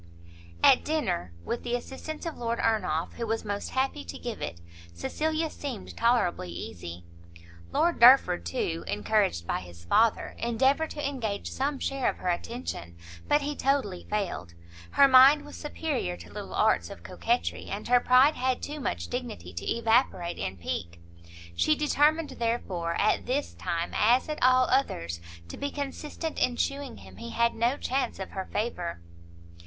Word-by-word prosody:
At 255 - +7
dinner, 300 - -1
with 235 - -2
the 240 0 -1
assistance 265 +6 -6
of 330 - -3
Lord 235 -1 -2
Ernolf, 215 -8 0
who 230 - -3
was 225 0 -2
most 205 0 -3
happy 270 +2 -1
to - - -7
give 235 -3 -6
it, 85 - -4 0.4
Cecilia 315 - -1
seemed 270 -7 -6
tolerably 230 - +1
easy. 85 0 -7 0.7
Lord 340 +1 +2
Derford, 235 - +7
too, 85 -1 -2
encouraged 105 - +1
by - - -1
his 85 -1 -12
father, 220 - +2
endeavoured 265 +7 +2
to 295 -2 -3
engage 225 -8 -3
some 280 +2 -1
share 270 -1 0
of - - -4
her 180 - -2
attention; 175 - -4 0.3
but 295 - +4
he 290 +1 -2
totally 265 -11 0
failed; 185 - -3 0.3
her 280 - +6
mind 275 +3 +7
was 295 - -10
superior 295 - -3
to 85 -1 -13
little - - -6
arts 85 -1 +2
of 85 - -10
coquetry, 85 -1 -1
and 205 +2 -5
her 245 0 +5
pride 255 +5 +5
had 255 -1 -1
too 295 +1 -5
much 85 - -3
dignity 85 +1 -5
to 85 - -4
evaporate 225 -7 +1
in 95 - -3
pique; 85 0 -4 0.6
she 85 - +3
determined, 300 +1 +2
therefore, 185 -8 -1
at 215 - +2
this 275 +3 -1
time, 170 0 -3
as 240 +4 +4
at 305 -1 -4
all 255 0 +6
others, 85 - 0 0.3
to - - -8
be 285 - -2
consistent 295 +3 -5
in 245 - +2
shewing 275 +1 -2
him - - -13
he 235 0 -7
had 235 0 +2
no 240 +5 +1
chance 265 0 -1
of 190 - -6
her 190 -1 -4
favour. 180 - -2
235 Hz, 165 wpm, -28 LUFS, -, 0.7 s, At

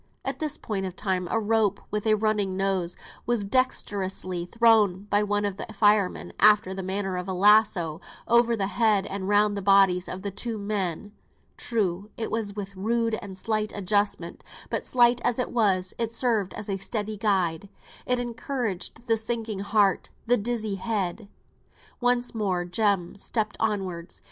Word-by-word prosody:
At - - -3
this 310 -3 -1
point 195 -3 -3
of 185 - -8
time 185 -3 -1
a 225 - +1
rope, 215 -2 +1
with 210 +1 -2
a 215 - +5
running 210 -3 0
noose, 190 -3 0 0.3
was 235 -4 0
dexterously 195 -7 -1
thrown 215 -3 +3
by 205 - +4
one 205 0 0
of 200 -1 -3
the - - -6
firemen, 205 -2 +2
after 210 -3 +5
the 190 - -4
manner 190 0 -2
of 180 +1 -4
a 190 - -2
lasso, 195 -5 +4 0.3
over 235 0 +4
the 195 - 0
head 210 -1 +2
and 195 -1 -4
round 205 0 +3
the 200 - -3
bodies 195 -2 +4
of 185 +1 -6
the 200 - -3
two 220 +3 -4
men. 200 -2 -3 0.4
True, 205 -4 -2
it 225 - -3
was 215 -2 -2
with 195 -1 -6
rude 230 +3 0
and 190 -2 -8
slight 215 +1 -1
adjustment: 205 +1 -1 0.3
but, - - -1
slight 240 -1 +3
as 245 - +1
it 250 - -2
was, 190 -6 +1
it 230 -1 0
served 230 -5 0
as 210 - -6
a 195 -2 -1
steadying 210 +1 -3
guide; 195 -4 0 0.4
it 250 - +2
encouraged 240 -3 -3
the 225 -2 +2
sinking 220 -2 -3
heart, 200 -1 +2 0.2
the 245 - +4
dizzy 220 -2 -2
head. 200 -1 -3 0.7
Once 245 0 +1
more 190 -5 -1
Jem 195 -1 0
stepped 215 0 -2
onwards. 190 -6 -3
205 Hz, 170 wpm, -26 LUFS, 190-225 Hz, 0.7 s, a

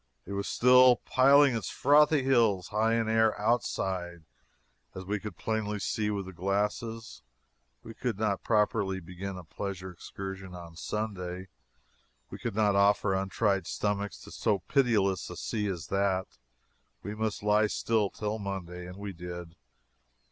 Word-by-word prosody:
It 100 - -9
was 100 +1 -2
still 125 0 +6
piling 140 0 +5
its 115 - -3
frothy 150 +1 +4
hills 115 -9 +2
high 110 +2 +2
in 115 -1 0
air 110 -1 +2
"outside," 95 -6 -1 0.7
as 95 0 -7
we 105 +2 -2
could 100 -4 -8
plainly 110 -2 -2
see 105 +1 -1
with 100 -2 -2
the 95 - -9
glasses. 105 +5 -2 0.6
We 115 - -9
could 120 -3 -3
not 105 -2 0
properly 105 -3 +1
begin 95 +2 -7
a 90 - -8
pleasure 95 +2 -6
excursion 95 +1 -8
on 85 -2 -10
Sunday; 95 -1 -4 0.8
we - - -7
could - - -4
not 105 -2 +3
offer 100 0 +3
untried 95 0 0
stomachs 105 -1 -2
to - - -12
so 105 -2 +1
pitiless 105 -9 +2
a 90 - -8
sea 105 -3 -2
as 90 -5 -4
that. 95 -8 -1 0.6
We 105 - -4
must 110 -1 -3
lie 105 +1 +4
still 110 -1 0
till 105 +2 -4
Monday. 90 -3 -5
And 90 +1 -9
we 100 -1 -6
did. 85 -1 -8
100 Hz, 150 wpm, -29 LUFS, 95-110 Hz, 0.8 s, still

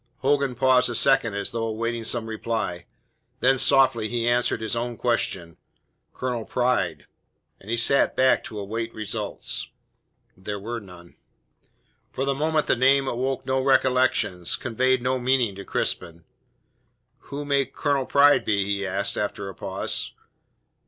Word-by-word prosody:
Hogan 140 -1 +1
paused 130 0 +4
a 120 - -3
second 115 -2 +3
as 100 - -2
though 115 -1 -2
awaiting 115 +1 -3
some 115 0 +1
reply; 110 -6 -4 0.5
then 135 0 +3
softly 130 -5 +4
he 120 0 -1
answered 120 -1 +1
his 110 +1 -2
own 120 0 -3
question: 90 -8 -1 0.5
"Colonel 125 -3 -3
Pride." 125 +2 -1 0.5
And 100 - -14
he 115 - 0
sat 135 +4 +3
back 130 0 +3
to 110 - -8
await 115 +3 -4
results. 105 -1 -3 0.7
There 100 +2 -6
were 115 +4 -5
none. 90 -4 -15 0.9
For 135 - -3
the 140 - +1
moment 155 +2 0
the - - +2
name 135 +2 +3
awoke 130 +2 -2
no 130 0 0
recollections, 130 -9 +2
conveyed 130 +1 0
no 130 +1 0
meaning 125 -4 +1
to 100 +1 -9
Crispin. 85 -2 -3 1.1
"Who 145 +1 -5
may 140 -1 +2
Colonel 140 -3 -1
Pride 145 +1 +5
be?" 100 -2 +1
he 100 -1 -1
asked, 100 +1 -1
after 100 -1 -3
a - - -8
pause. - - -3
120 Hz, 145 wpm, -24 LUFS, 105-130 Hz, 1.1 s, Pride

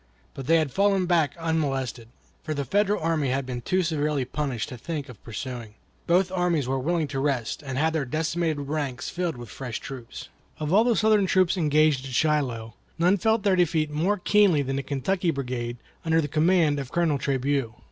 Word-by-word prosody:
But 135 -1 -7
they 165 - +5
had 155 -4 0
fallen 195 +3 +2
back 170 -4 +2
unmolested, 135 -8 -2 0.3
for 155 - -4
the 140 -1 -2
Federal 205 - +1
army 160 -4 +1
had 135 +1 -1
been 125 -1 -5
too 185 +8 +1
severely 150 -4 0
punished 135 -2 -3
to 125 - -7
think 150 +1 -4
of 120 -5 -13
pursuing. 115 -1 -6 0.3
Both 180 +2 +3
armies 175 -7 +1
were 135 +1 0
willing 160 +3 0
to 135 - -3
rest 135 -5 -1
and 135 -3 -5
have 160 +3 +2
their 155 -4 0
decimated 160 +2 -1
ranks 140 -3 -3
filled 175 -6 -2
with 120 -2 -9
fresh 125 -1 -5
troops. 130 -4 -8 0.3
Of 155 +2 -1
all 215 +3 +6
the 240 -2 +3
Southern 210 0 +3
troops 185 -1 +3
engaged 155 -4 +3
at 130 - -8
Shiloh 125 -7 0 0.2
none 180 +4 +3
felt 220 +2 +1
their 200 -3 +3
defeat 160 -4 +1
more 175 +8 +1
keenly 195 -6 +4
than 135 0 -2
the - - 0
Kentucky 150 +7 -1
brigade 125 -5 -3 0.3
under 160 0 +2
the 150 - 0
command 155 -1 +3
of 135 -2 -6
Colonel 165 -5 +1
Trabue. 135 -3 -1
150 Hz, 195 wpm, -26 LUFS, 135-175 Hz, 0.3 s, all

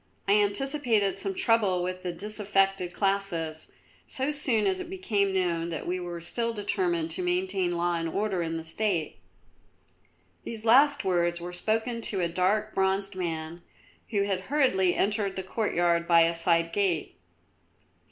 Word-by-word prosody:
I - - +3
anticipated 215 0 +2
some 390 -1 -1
trouble 225 - +2
with 185 0 -4
the 180 - -3
disaffected 195 -1 0
classes, 185 -6 -1 0.4
so 265 +3 -2
soon 260 -7 +1
as 375 -1 +1
it 365 -2 -7
became 215 - 0
known 170 -3 0
that 160 -3 -5
we 180 +1 -2
were 175 -1 -6
still 230 +7 -2
determined 180 -5 -1
to 165 - -2
maintain 180 0 0
law 175 0 0
and 165 0 -2
order 195 0 -1
in 165 -1 -2
the 165 - -6
State." 170 -1 -1 1.2
These 225 -1 -7
last 280 +2 +5
words 175 -2 +1
were 175 +1 -7
spoken 225 +5 -1
to 200 -3 0
a 175 - +1
dark, 195 +5 0
bronzed 195 +1 0
man 165 -2 -4 0.5
who 200 -3 +1
had 195 -2 -1
hurriedly 190 -11 +2
entered 205 -1 0
the 190 - -4
courtyard 175 -4 0
by 170 -1 +6
a 165 +1 +3
side 165 0 +1
gate. 190 -6 -1
190 Hz, 155 wpm, -27 LUFS, 175-215 Hz, 1.2 s, by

